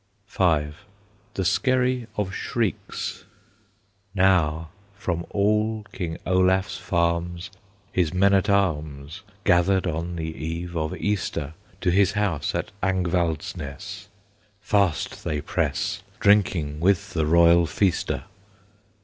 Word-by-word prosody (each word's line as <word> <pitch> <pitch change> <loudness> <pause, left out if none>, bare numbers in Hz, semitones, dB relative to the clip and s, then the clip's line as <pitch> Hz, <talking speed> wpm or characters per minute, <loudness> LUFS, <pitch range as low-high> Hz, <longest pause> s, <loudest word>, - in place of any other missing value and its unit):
V. 80 -7 +2 0.7
THE 95 - -1
SKERRY 125 +1 +1
OF 100 -2 -1
SHRIEKS. 115 -2 -3 0.9
Now 80 -4 +2 0.3
from 85 -4 -3
all 105 +1 +1
King 80 -3 -4
Olaf's 95 +1 +2
farms 85 +2 -1 0.4
His 90 -4 +1
men 100 +2 +3
at 100 +1 +3
arms 80 -4 0 0.2
Gathered 95 +2 +3
on 85 +1 -2
the 80 -1 -4
Eve 85 +2 -5
of 80 -1 -2
Easter; 85 -7 -2 0.3
To 90 - +2
his 100 +2 +3
house 100 -8 -1
at - - -2
Angvalds 90 -4 0
ness 75 +7 -8 0.5
Fast 100 -7 0
they 75 - -1
press, 70 - -1 0.2
Drinking 90 -8 +3
with 100 +3 +1
the 80 -3 +1
royal 85 +1 +5
feaster. 95 +3 0
90 Hz, 110 wpm, -24 LUFS, 80-100 Hz, 0.9 s, royal